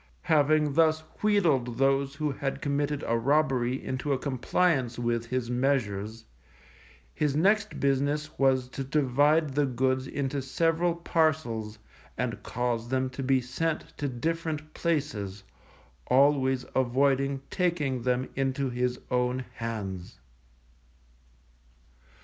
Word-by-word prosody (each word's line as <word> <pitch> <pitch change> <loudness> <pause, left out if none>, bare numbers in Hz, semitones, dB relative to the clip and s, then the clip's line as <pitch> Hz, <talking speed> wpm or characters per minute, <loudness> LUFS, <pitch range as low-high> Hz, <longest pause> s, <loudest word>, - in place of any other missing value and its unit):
Having 150 -1 +3
thus 160 0 +3 0.2
wheedled 155 - +2
those 135 +1 +2
who 150 0 -1
had 135 0 -3
committed 145 0 -1
a 115 - +1
robbery 130 -2 +2
into 130 +2 -1
a - - +1
compliance 130 0 0
with 120 -1 -1
his 125 -1 -2
measures, 115 -5 -1 0.9
his 150 -3 0
next 200 +6 +2
business 145 +2 0
was 130 -2 +3
to 135 - -5
divide 145 +2 +2
the 145 0 +2
goods 130 +1 0
into 140 0 -2
several 165 +5 +1
parcels, 140 -11 0 0.4
and - - -2
cause 120 -1 -2
them 130 0 0
to 135 - -6
be 130 0 +2
sent 150 +6 -3
to 145 - -1
different 155 +3 -3
places, 115 - -2 0.6
always 130 -1 +3
avoiding 135 +2 +2
taking 155 -9 0
them 125 +1 0
into 135 0 -1
his 125 0 -1
own 125 +1 0
hands. 100 -6 -5
135 Hz, 115 wpm, -28 LUFS, 125-150 Hz, 0.9 s, Having